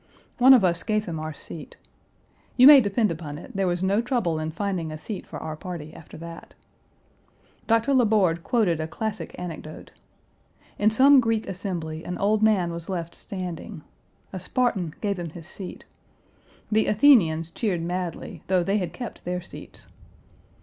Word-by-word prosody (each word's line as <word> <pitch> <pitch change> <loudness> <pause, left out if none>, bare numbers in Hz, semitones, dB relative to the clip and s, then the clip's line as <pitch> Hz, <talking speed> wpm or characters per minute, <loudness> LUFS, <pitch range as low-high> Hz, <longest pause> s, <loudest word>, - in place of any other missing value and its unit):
One 260 +2 +9
of 220 -7 +4
us 170 -2 +1
gave 215 0 -1
him 165 -3 -4
our 155 0 -4
seat. 155 +1 -8 0.8
You 255 - +8
may 285 -1 +10
depend 210 -1 +1
upon 155 -3 -6
it 170 - -12
there 195 -1 +1
was 175 +1 -1
no 200 +4 +2
trouble 230 - -1
in 155 0 -3
finding 175 -2 -3
a 155 - -6
seat 200 +5 -7
for - - -7
our 155 - -5
party 160 -3 -7
after 160 - -12
that. 165 +1 -10 1.1
Dr. 230 +4 +2
La 255 -3 +4
Borde 185 -6 +2
quoted 210 -10 +1
a 155 - -3
classic 220 +5 -5
anecdote. 160 -3 -8 0.9
In 210 - +4
some 270 +5 +6
Greek 225 -2 0
assembly 175 -5 -5
an 180 - -5
old 210 +2 +1
man 200 -6 +3
was 170 +1 -7
left 170 -3 -4
standing. 180 -5 -7 0.5
A 190 - -4
Spartan 185 -5 -1
gave 200 -3 -1
him 170 -1 -4
his 165 +1 -11
seat. 190 -1 -9 0.9
The 215 +1 +3
Athenians 185 - +4
cheered 185 -6 -1
madly, 175 -1 -4
though 185 -2 +2
they 195 +3 +1
had 175 -3 -4
kept 240 +5 -8
their 180 +1 -2
seats. - - -11
185 Hz, 170 wpm, -25 LUFS, 165-215 Hz, 1.1 s, may